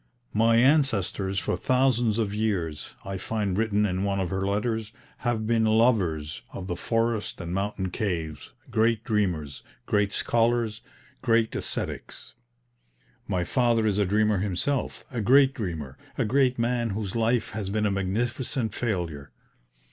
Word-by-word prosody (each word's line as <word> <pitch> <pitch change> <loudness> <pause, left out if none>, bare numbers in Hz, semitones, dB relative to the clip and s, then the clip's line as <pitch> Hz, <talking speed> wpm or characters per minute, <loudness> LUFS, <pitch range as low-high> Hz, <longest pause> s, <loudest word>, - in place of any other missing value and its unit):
"My 115 +2 +4
ancestors 115 - +2
for - - 0
thousands 125 -4 +2
of 105 -3 0
years," 95 -8 -2
I 95 -1 -4
find 105 -1 -1
written 105 0 +2
in 95 -1 -1
one 100 -1 0
of 90 -3 -2
her 95 0 -1
letters, 110 +2 -1 0.3
"have 120 -3 -1
been 115 0 +2
lovers 105 - +2
of - - -6
the 90 -2 -3
forest 115 +1 -1
and 85 -1 -5
mountain 95 -1 -2
caves, 85 -7 -3 0.2
great 115 0 +2
dreamers, 90 - -1 0.2
great 100 -1 +1
scholars, 115 -1 +1 0.4
great 115 -1 +2
ascetics. - - -5 0.9
My 90 -1 0
father 115 +3 +2
is 105 -1 +1
a 100 - +3
dreamer 105 0 +2
himself, 105 +8 -1
a 120 -3 -2
great 135 +5 +5
dreamer, 80 - -5 0.2
a - - +1
great 130 +2 +2
man 120 0 0
whose 105 -2 -4
life 115 0 +1
has 105 -2 -4
been 105 +1 0
a 105 - +2
magnificent 115 +5 -1
failure. 85 - -3
105 Hz, 145 wpm, -26 LUFS, 95-115 Hz, 0.9 s, great